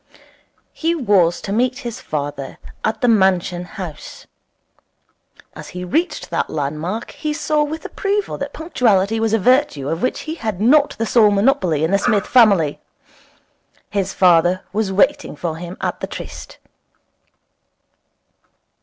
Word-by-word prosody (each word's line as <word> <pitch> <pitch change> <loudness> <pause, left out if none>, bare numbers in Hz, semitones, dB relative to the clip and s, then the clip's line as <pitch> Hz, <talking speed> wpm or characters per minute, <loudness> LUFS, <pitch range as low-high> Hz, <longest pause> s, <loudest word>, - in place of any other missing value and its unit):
He 330 +1 0
was 200 - +2
to 195 - -4
meet 250 +3 +1
his 235 -2 -5
father 145 -2 -5 0.3
at 220 0 -1
the 245 - +2
Mansion 190 -5 +2
House. 165 -4 -9 1.3
As - - -9
he 180 - -4
reached 320 - -2
that - - -1
land 150 0 -3
mark 190 +9 -4
he 305 -1 -3
saw 300 0 0
with 305 +2 -3
approval 405 +1 -2
that - - -4
punctuality 225 - +1
was 225 -1 0
a 225 - +3
virtue 245 - +2
of 165 +2 -2
which 255 - -1
he 315 - -5
had 220 - -4
not 280 +7 +3
the 225 - -1
sole 220 -2 +5
monopoly 200 - +2
in 160 - +1
the 200 - +3
Smith 210 -3 +1
family. 200 - +4 1.1
His 195 -2 -1
father 180 0 +3
was 210 -1 0
waiting 210 - +1
for 160 +1 -4
him 175 +2 -8
at - - -2
the - - -4
tryst. - - -9
205 Hz, 145 wpm, -19 LUFS, 175-250 Hz, 1.3 s, sole